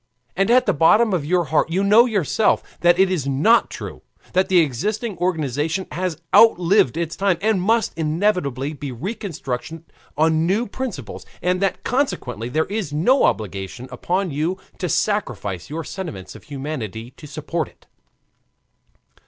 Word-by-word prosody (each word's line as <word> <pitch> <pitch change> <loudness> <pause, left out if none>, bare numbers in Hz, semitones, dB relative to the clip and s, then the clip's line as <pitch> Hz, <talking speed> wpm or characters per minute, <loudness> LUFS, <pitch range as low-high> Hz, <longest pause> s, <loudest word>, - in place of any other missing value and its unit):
And 195 +3 +1
at 250 +2 +5
the 200 - +2
bottom 200 +8 +4
of 165 -6 0
your 175 +3 +2
heart 155 +1 +1
you 185 +4 0
know 215 +5 +6
yourself 210 - +1 0.2
that 175 0 +4
it 190 0 +4
is 155 -7 -1
not 150 - +3
true, - - -8 0.3
that 185 +1 +2
the 185 - +4
existing 200 - 0
organization 160 0 -1
has 180 -3 -3 0.2
outlived 180 - +5
its 165 -1 -2
time, 195 -3 +1
and 210 -2 +1
must 225 +3 +1
inevitably 155 - 0
be 145 -2 -6
reconstructed 165 - -5 0.3
on 160 +1 +2
new 210 +6 +1
principles, 200 - -6 0.2
and 180 +1 0
that 195 - -1
consequently 125 - -2
there 155 +5 +1
is 205 -6 -4
no 180 - +3
obligation 105 +4 -3
upon 185 0 -1
you 160 +6 -1 0.2
to 180 - -2
sacrifice 110 - -1
your 160 +3 -4
sentiments 155 - -7
of - - -14
humanity 130 -6 -6
to 150 - -11
support 155 +2 -3
it. - - -22
170 Hz, 155 wpm, -21 LUFS, 145-195 Hz, 0.3 s, know